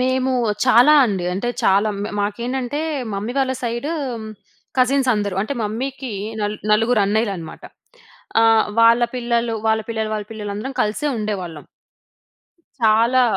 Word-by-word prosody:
మేము 260 +1 +1 0.3
చాలా 255 +5 +6
అండి. 190 -4 -2
అంటే, 220 +6 -2
చాలా 200 +3 +3
మ - - -2
మాకేంటంటే 245 +6 -2 0.3
మమ్మీ 210 +5 -3
వాళ్ళ 260 -1 +1
సైడు 240 +5 -2 0.9
కజిన్స్ 260 +1 +3
అందరూ. 205 -3 -2
అంటే 220 - -3
మమ్మీ‌కి 255 +4 -4 0.3
నల్ 210 0 -2 0.2
నలుగురు 225 +1 +3
అన్నయ్యలునమాట. 200 -6 -2 0.8
ఆహ్, 225 -1 +5
వాళ్ళ 230 +1 +6
పిల్లలు, 235 -1 0
వాళ్ళ 220 0 +2
పిల్లలు, 220 -1 -2
వాళ్ళ 210 -1 -4
పిల్లలు 210 -2 -5
అందరం 265 +6 -5
కలిసే 215 +8 -2
ఉండేవాళ్ళం. 185 -8 -4 1.2
చాలా. 230 +4 +4
225 Hz, 125 wpm, -20 LUFS, 210-250 Hz, 1.2 s, చాలా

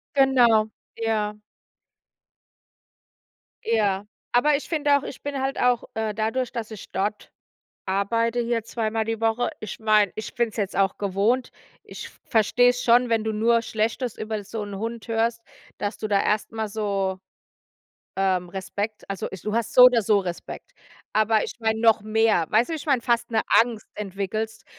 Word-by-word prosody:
Genau. 240 -5 +4 0.3
Ja. 215 -2 -1 2.3
Ja. 205 -3 +1 0.3
Aber 290 +5 +4
ich 280 - -4
finde 295 -3 +2
auch 280 - -6
ich 270 - -8
bin 285 -1 -4
halt 270 +1 -2
auch, 250 -1 +2
äh, 220 -1 -2
dadurch, 225 +4 -1
dass 230 -2 -5
ich 215 - -10
dort 205 +2 -3 0.6
arbeite 230 +5 0
hier 235 -1 -1
zweimal 225 -1 -2
die 225 -1 -3
Woche, 225 +2 +1
ich 215 - -7
meine, 215 -3 +3
ich 215 - -6
bin 235 -1 +1
es - - -16
jetzt 200 -3 -2
auch 195 -1 +1
gewohnt. 205 +6 0 0.3
Ich - - -9 0.2
verstehe 240 +2 +3
es 245 0 -1
schon, 245 +1 +4
wenn 225 -2 +1
du 220 - -1
nur 230 +2 +2
Schlechtes 225 +2 -2
über 215 -1 -4
so 210 +1 -5
'n 205 -1 -7
Hund 230 +2 -5
hörst, 230 0 0 0.4
dass 205 +1 -3
du 215 - -4
da 200 -2 +2
erst 210 0 0
mal 220 -1 -3
so, 200 -3 -2 1.0
ähm, 185 -2 +1
Respekt 200 +3 -5
also, 195 -2 -4
ich 190 - -9
du 210 - -3
hast 230 -1 -1
so 250 - +8
oder 250 -3 +6
so 210 0 +3
Respekt. 185 - -7 0.4
Aber 215 0 +2
ich - - -5
meine, 220 0 0
noch 225 -1 +5
mehr. 215 -5 +2
Weißt 225 +3 +3
du, - - -4
wie - - -1
ich 305 - -9
meine, 265 -5 +2
fast 235 -1 0
'ne 220 -1 +1 0.2
Angst 230 -2 -2
entwickelst, 210 +2 -4
220 Hz, 175 wpm, -24 LUFS, 210-235 Hz, 2.3 s, so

